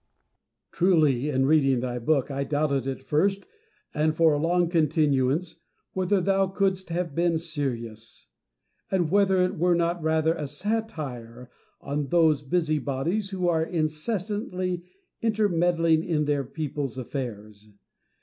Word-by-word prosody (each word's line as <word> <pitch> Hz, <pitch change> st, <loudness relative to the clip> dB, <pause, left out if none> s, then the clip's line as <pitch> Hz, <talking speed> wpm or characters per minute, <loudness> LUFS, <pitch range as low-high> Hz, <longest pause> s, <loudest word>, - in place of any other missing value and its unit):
Truly, 150 Hz, -7 st, +2 dB
in 135 Hz, -2 st, +1 dB
reading 135 Hz, -3 st, +3 dB
thy 125 Hz, 0 st, -3 dB
book, 140 Hz, +3 st, +1 dB
I 140 Hz, 0 st, -2 dB
doubted 140 Hz, -2 st, 0 dB
at 135 Hz, 0 st, -4 dB
first, 195 Hz, +9 st, +1 dB, 0.5 s
and 155 Hz, +1 st, +1 dB
for 160 Hz, -1 st, +4 dB
a 145 Hz, -, 0 dB
long 175 Hz, +2 st, +2 dB
continuance, 155 Hz, -1 st, +1 dB, 0.4 s
whether 190 Hz, +1 st, +1 dB
thou 195 Hz, +1 st, +2 dB
couldst 190 Hz, -1 st, -1 dB
have 170 Hz, -2 st, -2 dB
been 170 Hz, +1 st, +1 dB
serious; 120 Hz, -9 st, -5 dB, 0.6 s
and 175 Hz, -4 st, 0 dB
whether 195 Hz, -2 st, +4 dB
it 180 Hz, -, -2 dB
were 175 Hz, +1 st, +3 dB
not 170 Hz, 0 st, 0 dB
rather 160 Hz, 0 st, +2 dB
a 150 Hz, -3 st, -4 dB
satire 145 Hz, -, -4 dB, 0.3 s
on 145 Hz, 0 st, -3 dB
those 160 Hz, -2 st, +3 dB
busy 155 Hz, +1 st, 0 dB
bodies 165 Hz, +10 st, -2 dB
who 185 Hz, -2 st, -2 dB
are 165 Hz, -2 st, +2 dB
incessantly 180 Hz, +3 st, -2 dB, 0.4 s
intermeddling 175 Hz, -7 st, +2 dB
in 160 Hz, -4 st, 0 dB
other 145 Hz, -2 st, 0 dB
people's 140 Hz, -1 st, -4 dB
afiairs. 110 Hz, -5 st, -6 dB
160 Hz, 130 wpm, -26 LUFS, 140-180 Hz, 0.6 s, for